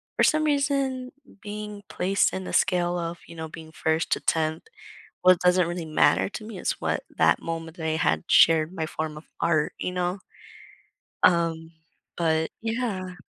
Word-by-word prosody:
for - - +2
some 310 -1 +3
reason, 275 -3 0 0.3
being 210 0 -7
placed 195 +2 +1
in 190 - -3
the - - -6
scale 175 -1 +2
of, 170 0 -4
you 170 - -11
know, 160 -1 -5
being 160 0 -11
1st 160 0 -1
to - - +2
10th, 160 -1 0 0.6
well, 185 0 +8
it - - -19
doesn't 180 -1 +4
really 175 -1 -4
matter 155 +4 +3
to 215 - -7
me, 215 -2 -8
it's - - -2
what - - -1
that - - +4
moment 165 +1 -5
that 160 - -5
I 160 - +1
had 80 - +1
shared 160 +1 +5
my 160 -4 -2
form 155 -1 -4
of 155 - -11
art, 155 -3 +1
you - - -3
know? 180 +1 -2 1.0
Um, 165 -2 +2 0.5
but 160 -1 +1
yeah. 225 -6 -3
175 Hz, 175 wpm, -26 LUFS, 160-200 Hz, 1.0 s, well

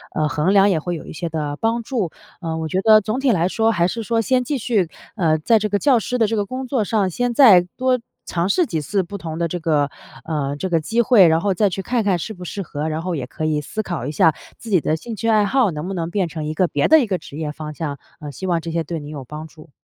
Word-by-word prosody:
呃， 155 -1 +1
衡 150 +7 +1
量 200 0 +6
也 175 -5 +2
会 175 +3 -3
有 160 - -8
一 - - -9
些 170 +2 -4
的 150 -3 -3
帮 230 +1 0
助。 220 - -2 0.3
呃， 165 -2 -3
我 160 0 -3
觉 185 +4 0
得 215 +1 +6
总 215 +5 -2
体 270 -1 +1
来 175 -4 +2
说 225 +3 +2
还 175 -5 +2
是 230 +4 -4
说 230 +1 +1
先 255 +3 +2
继 290 +3 -1
续， 210 -7 +1 0.3
呃， 160 -5 +2
在 220 +8 +3
这 215 - -1
个 205 -1 0
教 265 -2 +4
师 250 +3 -2
的 230 - +3
这 225 - -1
个 205 - 0
工 255 +5 -5
作 250 -3 0
上， 200 -3 +1
先 245 +7 -1
再 225 -9 +8 0.2
多 255 0 +2 0.3
尝 170 +1 -1
试 350 - +3
几 160 - -2
次 195 +7 0
不 200 +4 -7
同 165 -4 -6
的 170 - +1
这 175 +2 -4
个 150 -4 +1 0.4
呃， 145 -3 -2
这 190 +5 -3
个 165 -2 +2
机 225 +10 0
会， 225 -6 +6
然 160 0 +3
后 200 0 +1
再 210 +2 +3
去 190 +1 -4
看 235 +4 -1
看 190 -4 +1
适 220 - -5
不 180 -3 -10
适 200 +3 -5
合， 155 -3 -4
然 155 +1 -3
后 180 0 -2
也 135 -5 -3
可 145 - -7
以 155 -1 +1
思 215 +8 -4
考 175 - -4
一 145 - -3
下 155 +1 +3 0.2
自 230 - -9
己 190 -4 +4
的 155 - 0
兴 225 +8 -7
趣 225 - -3
爱 215 -2 +4
好 240 -1 +2
能 155 +3 -5
不 195 - -3
能 165 -2 -3
变 190 -1 0
成 155 -1 -5
一 155 - -3
个 180 +3 +2
别 145 -3 +1
的 315 - +7
一 245 - -1
个 190 -3 0
职 145 - -11
业 155 -2 -3
方 155 0 -7
向。 145 -1 -4 0.2
呃， 150 -1 -7
希 190 - -7
望 175 -3 0
这 165 - -6
些 165 0 -1
对 165 +1 -4
您 145 -1 -9
有 145 -3 -7
帮 150 +4 -8
助。 155 0 -16
180 Hz, 320 characters per minute, -21 LUFS, 155-220 Hz, 0.4 s, 再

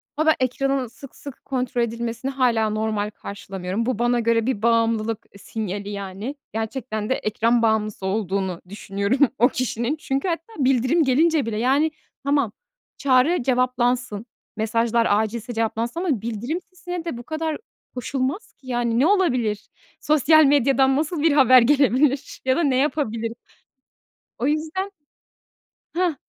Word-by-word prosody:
Ha, 310 +2 0
ben 315 - +6
ekranın 265 0 0
sık 245 +4 -13
sık 280 -2 -11
kontrol 250 -2 -1
edilmesini 235 +3 -3
hâlâ 235 -5 +2
normal 215 -1 -1
karşılamıyorum. 200 +1 -5
Bu 245 -3 -1
bana 240 0 +2
göre 230 -1 +2
bir 250 -5 -1
bağımlılık, 230 -1 +1
eee, 200 - -15
sinyali, 205 -1 -5
yani. 200 +6 -5 0.2
Gerçekten 220 -1 -3
de - - +3
ekran 230 +2 +1
bağımlısı 215 -3 0
olduğunu 190 -3 -1
düşünüyorum 200 +4 -2 0.2
o 245 - +5
kişinin. 250 +2 -2
Çünkü 275 +1 -2
hatta 340 +5 -3
bildirim 260 +5 +3
gelince 300 +1 +3
bile. 220 -2 -3
Yani 275 +7 +2 0.3
tamam, 280 -5 +1 0.5
çağrı 265 +3 +3
cevaplansın, 245 -3 0 0.3
mesajlar 230 +1 +1
acilse 220 +3 0
cevaplansın 230 +6 -2
ama 290 - 0
bildirim 235 - -3
sesine 355 -2 -6
de 330 -8 -4
bu 240 - -8
kadar 315 +1 -3 0.4
koşulmaz 270 - -3
ki. 265 - -21
Yani 240 -1 0
ne 275 - +4
olabilir? 250 - +1 0.3
Sosyal 310 +1 +5
medyadan 270 -1 +4
nasıl 310 +1 -1
bir 325 - +5
haber 255 -3 +7
gelebilir 275 +1 +2
ya 260 - +3
da 340 - +2
ne 275 -4 +2
yapabilirim? 230 -6 -1 1.0
O 250 - -1
yüzden 320 +6 -1 1.0
Hah, 350 -2 +1
245 Hz, 140 wpm, -23 LUFS, 220-280 Hz, 1.0 s, haber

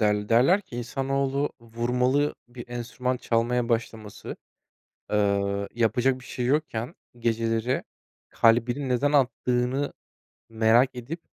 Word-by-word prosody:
derl 105 -1 +1
Derler 135 - +5
ki, 155 -11 -10
insanoğlu, 135 +3 -1
vurmalı 125 +5 0
bir 120 -1 -10
enstrüman 125 +1 -3
çalmaya 120 0 0
başlaması, 115 -2 -3 0.7
eee 100 -1 +1
yapacak 120 +3 +1
bir - - -14
şey 125 - -4
yokken 130 -5 -1 0.2
geceleri 115 +1 0 0.5
kalbinin 120 +4 +2
neden 135 +4 +1
attığını 125 0 +1 0.6
merak 115 +3 +3
edip, 135 +8 -6
120 Hz, 105 wpm, -26 LUFS, 115-130 Hz, 0.7 s, Derler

